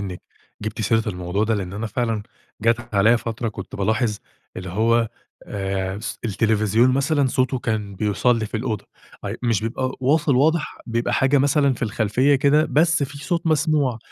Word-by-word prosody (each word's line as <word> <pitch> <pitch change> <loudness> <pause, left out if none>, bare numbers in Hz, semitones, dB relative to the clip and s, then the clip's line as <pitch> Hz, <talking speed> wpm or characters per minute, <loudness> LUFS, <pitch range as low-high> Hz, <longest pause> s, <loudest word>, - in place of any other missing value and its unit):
إنِك 95 -3 -6 0.4
جِبتِ 110 +2 -4
سيرة 110 +1 +1
الموضوع 90 +2 -1
ده، 110 +1 +1
لإن 95 -3 -4
أنا 110 +3 -3
فعلًا 115 -1 -1 0.4
جات 115 +1 0
عليّا 110 +4 +5
فترة 115 0 -3
كنت - - -8
بالاحظ 110 +2 0 0.4
اللي 90 0 -6
هو 115 +4 +2 0.4
آآ 95 -1 -3
س - - -5
التلفزيون 110 +2 +2
مثلًا 140 +2 +2
صوته 130 0 0
كان 105 -4 -3
بيوصل 105 +4 +1
لي 110 - -2
في 110 - -4
الأوضة، 110 -3 -3 0.4
اي - - -3
مش 115 -4 +1
بيبقى 130 +3 -2
واصل 140 0 +2
واضح 155 +3 +1
بيبقى 115 +1 -1
حاجة 135 +3 +3
مثلًا 140 0 +3
في - - -9
الخلفية 115 +5 +2
كده، 145 +2 +4
بس 165 +1 +3
في 140 +1 -4
صوت 170 +4 -2
مسموع، 150 -6 +2
115 Hz, 170 wpm, -22 LUFS, 105-135 Hz, 0.4 s, عليّا